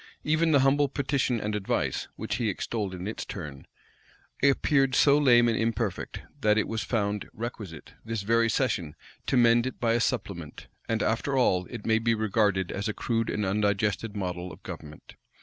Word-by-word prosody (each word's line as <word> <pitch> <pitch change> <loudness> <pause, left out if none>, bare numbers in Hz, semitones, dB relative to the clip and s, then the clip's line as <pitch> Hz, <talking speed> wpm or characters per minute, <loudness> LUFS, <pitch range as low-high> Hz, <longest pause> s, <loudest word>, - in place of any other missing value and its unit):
Even 155 +2 +2
the 140 -3 +5
humble 140 +1 +3
petition 135 -3 0
and 105 0 -3
advice, 105 -2 -1
which - - -3
he - - 0
extolled 105 -5 -3
in 90 +2 -6
its 110 - -4
turn, 75 -9 -8 0.7
appeared 135 -1 +3
so 140 -1 +6
lame 120 -5 +5
and 115 - +2
imperfect, 115 -3 -2 0.2
that 105 0 +3
it 110 - +1
was 115 -1 -2
found 105 -3 -1
requisite, 105 -8 -7
this 115 -2 -3
very 115 +2 +3
session, 105 - -1 0.3
to 130 - +2
mend 120 0 +5
it 130 - -6
by 115 -1 +2
a 120 - +2
supplement; 100 - -3 0.2
and 115 0 +1
after 135 +5 0
all, 90 -8 +2
it 115 -4 -8
may 110 0 +3
be 115 0 +1
regarded 105 -4 +1
as 100 +2 -3
a 110 - -1
crude 115 -1 -1
and 105 - -1
undigested 105 +1 0
model 90 -2 -4
of 80 +5 -14
government. 80 -4 -10
110 Hz, 180 wpm, -27 LUFS, 100-120 Hz, 0.7 s, so